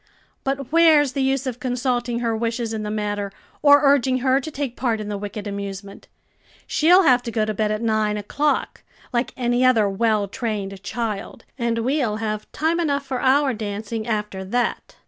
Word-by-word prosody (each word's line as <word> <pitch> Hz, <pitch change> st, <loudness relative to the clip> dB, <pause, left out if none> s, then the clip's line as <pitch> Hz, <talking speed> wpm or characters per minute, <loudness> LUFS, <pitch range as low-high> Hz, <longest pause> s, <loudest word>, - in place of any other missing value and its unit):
"But 270 Hz, -1 st, -3 dB
where's 315 Hz, -4 st, +5 dB
the 275 Hz, -, -1 dB
use 270 Hz, 0 st, +1 dB
of 250 Hz, -2 st, -4 dB
consulting 245 Hz, -2 st, -1 dB
her 230 Hz, -2 st, 0 dB
wishes 230 Hz, 0 st, -2 dB
in 220 Hz, -, -3 dB
the 210 Hz, -, -4 dB
matter, 205 Hz, -1 st, -2 dB, 0.3 s
or 285 Hz, 0 st, +6 dB
urging 270 Hz, -2 st, +4 dB
her 260 Hz, +1 st, +4 dB
to 315 Hz, -, -6 dB
take 280 Hz, -5 st, -4 dB
part 235 Hz, -4 st, -1 dB
in 210 Hz, -1 st, -5 dB
the 205 Hz, -, -3 dB
wicked 205 Hz, +1 st, -6 dB
amusement? 200 Hz, -1 st, -6 dB, 0.6 s
she'll 355 Hz, +5 st, +5 dB
have 250 Hz, -6 st, +5 dB
to 240 Hz, -, -5 dB
go 220 Hz, -1 st, +1 dB
to 215 Hz, -, -2 dB
bed 215 Hz, +1 st, 0 dB
at 215 Hz, +2 st, -2 dB
nine 215 Hz, -2 st, +1 dB
o'clock, 285 Hz, +9 st, -1 dB, 0.3 s
like 240 Hz, +1 st, 0 dB
any 245 Hz, 0 st, +1 dB
other 235 Hz, -5 st, +4 dB
well 210 Hz, +1 st, +1 dB
trained 200 Hz, -4 st, -4 dB
child, 220 Hz, -2 st, -4 dB
and 235 Hz, -2 st, -1 dB
we'll 250 Hz, -2 st, 0 dB
have 215 Hz, -1 st, -4 dB
time 325 Hz, +2 st, 0 dB
enough 285 Hz, -4 st, 0 dB
for 260 Hz, -2 st, -3 dB
our 270 Hz, 0 st, +3 dB
dancing 215 Hz, +1 st, -4 dB
after 210 Hz, -3 st, -2 dB
that." 240 Hz, +6 st, -2 dB
235 Hz, 185 wpm, -22 LUFS, 210-265 Hz, 0.6 s, or